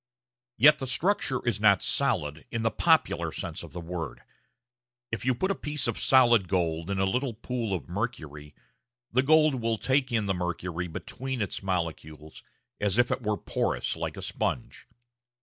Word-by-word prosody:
Yet 150 +6 +7
the 135 - -4
structure 135 -2 0
is 110 -4 +1
not 100 -3 +4
"solid" 75 +1 +1
in 115 -1 -3
the 115 - +2
popular - - +2
sense - - -5
of - - -10
the 90 - -6
word. 85 -4 -6 0.9
If 110 -1 -4
you 130 -1 +2
put 190 +10 0
a - - +2
piece 150 -8 -2
of 115 - -2
solid 120 -7 +5
gold 85 -2 -1
in 100 - -1
a 95 - +2
little 125 +4 -1
pool 115 -1 -3
of 90 -3 -3
mercury, 75 0 -5 0.6
the 130 - +3
gold 155 -2 +4
will 115 0 0
take 130 +3 +1
in 110 -3 +1
the 95 - +1
mercury 90 -1 -3
between 130 +9 -5
its 100 -4 -2
molecules, 80 -4 -4 0.4
as 100 0 0
if 120 0 +3
it - - -1
were 105 -2 -1
porous - - -1
like - - -4
a - - -6
sponge. - - -3
105 Hz, 175 wpm, -28 LUFS, 90-130 Hz, 0.9 s, Yet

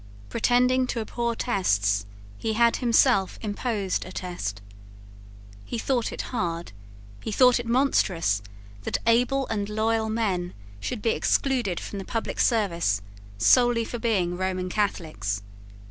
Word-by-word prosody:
Pretending 250 +2 +3
to 240 - -2
abhor 235 +1 -2
tests, 100 - +1 0.3
he 220 - -1
had 235 +1 +3
himself 235 -4 +3
imposed 205 -2 -1
a 185 - -10
test. 175 - -4 1.0
He 235 - -5
thought 240 0 0
it - - -4
hard, 170 - -2 0.5
he - - -4
thought 250 +3 +5
it 240 - -5
monstrous, 190 - +2 0.4
that - - -1
able 250 +4 +3
and 205 -2 -2
loyal 220 +1 0
men 195 -6 -1 0.2
should 220 - -4
be 225 - +3
excluded 245 -11 +1
from 200 - -6
the 195 - -6
public 225 +3 -3
service 170 - +1 0.3
solely 235 - +4
for 240 - -5
being 190 -7 +1
Roman 185 0 -2
Catholics. 155 - -2
215 Hz, 130 wpm, -26 LUFS, 175-235 Hz, 1.0 s, thought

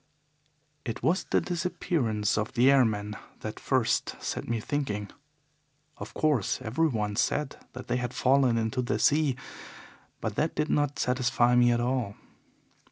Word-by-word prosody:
"It 115 -1 -5
was 175 +4 +2
the - - +2
disappearance 155 - -1
of 105 0 -2
the 125 +3 +5
airmen 105 -6 +2 0.3
that - - -6
first - - 0
set - - -4
me 115 -1 -1
thinking. 110 -6 -3 0.9
Of - - -9
course, 145 -10 +1
everyone 115 -4 0
said 145 +5 0 0.2
that 130 - -8
they 125 - 0
had 120 -1 -3
fallen 130 -2 +3
into 115 +3 0
the 120 -3 -1
sea, 145 +3 +3 0.8
but 110 - -3
that 155 +2 0
did 150 +1 0
not 145 -1 +1
satisfy 125 -1 +2
me 120 0 +5
at 120 0 +1
all. 120 -4 -1
125 Hz, 145 wpm, -28 LUFS, 110-145 Hz, 0.9 s, the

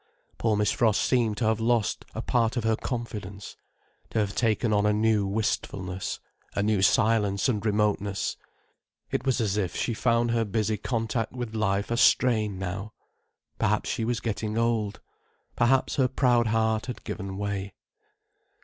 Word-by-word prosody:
Poor 110 -2 +2
Miss 105 -1 +2
Frost 110 -3 +2
seemed 115 -5 +1
to 120 - 0
have 110 0 +2
lost 115 -2 +1
a - - -3
part 115 0 +1
of 120 - 0
her 110 0 +2
confidence, 105 -6 -6 0.5
to - - -4
have 105 -2 +1
taken 115 -1 +1
on 105 0 +3
a - - +4
new 105 -1 +2
wistfulness, 95 -2 -2 0.4
a 100 - +1
new 105 -2 +2
silence 105 0 +3
and 105 -6 0
remoteness. 105 -2 0 0.8
It 130 - -2
was 130 -1 +2
as 105 -3 0
if 95 -5 -1
she 120 - -1
found 115 +1 +1
her 115 -1 +2
busy 110 0 -1
contact 115 0 -2
with 120 -3 -5
life 100 -1 0
a 120 - +1
strain 110 -6 +3
now. 95 +3 -5 0.7
Perhaps 105 +1 +1
she 115 - -2
was 120 0 -1
getting 110 -1 -2
old. 115 -3 0 0.5
Perhaps 130 +2 +2
her 130 -2 +4
proud 120 -3 +2
heart 110 0 +1
had 125 - -6
given 95 0 -5
way. 100 -1 -3
110 Hz, 160 wpm, -27 LUFS, 100-115 Hz, 0.8 s, a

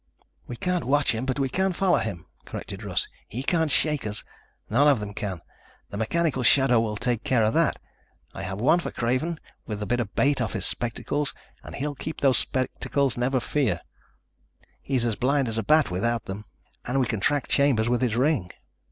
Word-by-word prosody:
"We 120 - -5
can't 180 +6 -1
watch 140 0 +3
him, 120 +3 -3
but 130 - 0
we 135 -1 +1
can 190 +7 0
follow 185 0 +2
him," 90 -6 -4 0.2
corrected 100 +1 -7
Russ. 100 -4 -1 0.2
"He 125 +4 -5
can't 160 +1 +1
shake 150 -5 +2
us. 105 +1 -4 0.4
None 135 +7 +4
of 140 -5 +5
them 105 -1 -5
can. 95 -4 -4 0.5
The 100 - -5
mechanical 135 +5 0
shadow 125 0 +5
will 110 -2 -1
take 120 0 -1
care 120 -4 +2
of 110 - +2
that. 165 -2 +2 0.6
I - - -6
have 95 +3 -4
one 140 +9 +4
for - - -4
Craven 130 +8 -1 0.3
with 105 -2 -4
a 105 - -3
bit 120 +3 0
of 110 -4 -4
'bait' 140 -2 +2
off 115 - -1
his - - -1
spectacles 140 +4 -2 0.3
and - - -9
he'll 145 +2 -2
keep 155 +3 -6
those 135 -3 +4
spectacles, 135 +1 0
never 125 +2 +1
fear. 120 - 0 1.0
He's 120 -5 0
blind 135 +1 +2
as 115 0 -1
a - - -1
bat 155 -8 +4
without 115 +5 -1
them. 100 +2 -6 0.4
And 130 +2 -1
we 130 - +3
can 110 -3 -2
track 145 +8 +1
Chambers 135 -6 +3
with 120 +1 +1
his 120 -3 +1
ring." 125 - +1
125 Hz, 195 wpm, -26 LUFS, 110-145 Hz, 1.0 s, of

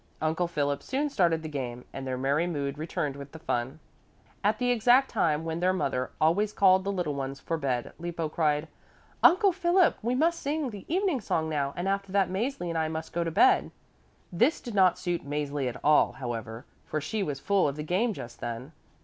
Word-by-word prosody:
Uncle 160 +3 0
Philip 145 -4 -1
soon 285 +3 -2
started 170 - +2
the - - -4
game, 125 -5 -5
and 135 -1 -6
their 130 -1 -2
merry 140 +6 +1
mood 145 -4 -3
returned 150 -3 -2
with 140 0 -10
the - - -8
fun. 130 -2 -2 0.7
At 210 +2 +2
the 245 -1 +1
exact 245 +3 +4
time 160 -8 +1
when 165 0 -2
their 185 +1 +2
mother 130 -8 -1
always 200 +7 +2
called 190 -1 +5
the 200 - -1
little 175 -6 -2
ones 135 0 -4
for 165 - -2
bed 130 -6 -2
Lippo 170 -1 -3
cried, 150 -1 0 0.5
"Uncle 385 +3 +6
Philip, 360 0 +3
we 240 +3 0
must 335 +5 +2
sing 290 -2 -1
the 200 -3 -9
evening 365 - +1
song 160 -5 -1
now 140 -3 -1
and 175 +2 -3
after 195 0 -1
that 195 -2 +2
Mäzli 205 -1 -2
and 165 -1 -1
I 160 - +1
must 160 0 -5
go 170 - 0
to 165 - -2
bed." 385 - +4 0.6
This 240 - +3
did 240 - -7
not 185 -3 +4
suit 175 -2 -2
Mäzli 145 -2 -2
at 125 - -8
all, 150 0 +4
however, 115 -2 -6 0.2
for 155 - -3
she 155 +9 -3
was 145 -7 -2
full 195 +4 +2
of 140 - -2
the 150 - -5
game 190 +9 +1
just 125 - -8
then. 120 +5 -5
165 Hz, 210 wpm, -28 LUFS, 140-205 Hz, 0.7 s, Uncle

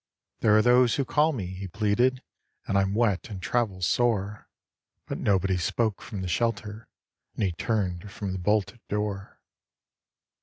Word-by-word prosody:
" - - -57
There 105 -1 +5
are 110 - +4
those 125 -1 +5
who 140 - 0
call 150 +4 +3
me," 115 -11 -4
he 95 +2 -6
pleaded, 115 +7 +1 0.2
" - - -38
And 100 - -1
I'm 100 0 +2
wet 110 -5 +1
and 100 -3 -6
travel 100 -2 -1
sore." 105 0 0 0.6
But - - -5
nobody 95 -2 +2
spoke 110 +4 -1
from 100 -4 -6
the - - -3
shelter. 110 +1 -2 0.5
And - - -2
he 95 - +2
turned 95 -1 -2
from 100 -1 -4
the 95 - -3
bolted 105 +4 0
door. 105 -1 -3
105 Hz, 165 wpm, -27 LUFS, 95-115 Hz, 0.6 s, There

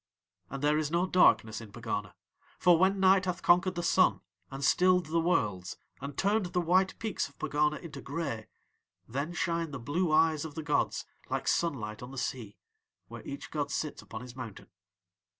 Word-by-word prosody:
"'And 140 +1 -6
there 150 +1 +3
is 155 -2 -1
no 170 +3 +1
darkness 115 - +3
in 110 -3 -11
Pegana, - - -4 0.4
for 175 -1 +5
when 190 +2 +3
night 190 0 +5
hath 180 -1 -3
conquered 180 +1 +4
the 175 - -2
sun 185 +2 +3 0.3
and 135 0 -4
stilled 180 +1 +4
the 165 +2 0
Worlds 105 - 0 0.2
and 140 0 -6
turned 200 0 +1
the 180 - -1
white 185 +2 +2
peaks 215 -7 -2
of 140 - -25
Pegana 150 +1 +1
into 145 -5 -9
grey 135 -7 -4 0.6
then 140 +7 -3
shine 170 -1 -1
the 140 - -6
blue 150 +8 -1
eyes 155 -1 +3
of 160 -1 -7
the 160 - -4
gods 150 -1 0 0.2
like - - -2
sunlight 115 -11 -1
on 125 - -8
the 135 - -10
sea, 120 -5 -4 0.5
where - - -8
each - - -7
god - - -2
sits - - -3
upon 110 - -8
his 125 0 -10
mountain. 120 -6 -8
155 Hz, 185 wpm, -30 LUFS, 135-180 Hz, 0.6 s, for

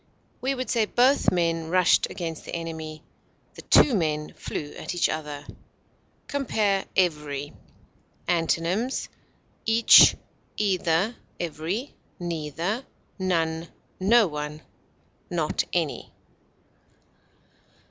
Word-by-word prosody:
We 270 +2 0
would 255 0 -4
say 230 -3 +2
both 255 +6 +3
men 165 -2 0
rushed 180 0 +4
against 165 -3 -5
the - - -6
enemy; 160 -2 -6 0.5
the - - -10
two 280 - +5
men 155 -6 -1
flew 145 -1 -5
at - - -6
each 175 - +2
other. 150 -2 -5 0.8
Compare 215 -8 0
EVERY. 150 -5 0 0.7
Antonyms: 175 +8 0 0.6
each, 225 +1 +8 0.4
either, 190 +1 +1 0.2
every, 175 - -3 0.3
neither, 170 - -3 0.4
none, 165 -3 0 0.3
no 220 +4 +5
one, 150 -2 -5 0.7
not - - 0
any. - - -2
170 Hz, 95 wpm, -26 LUFS, 160-210 Hz, 0.8 s, each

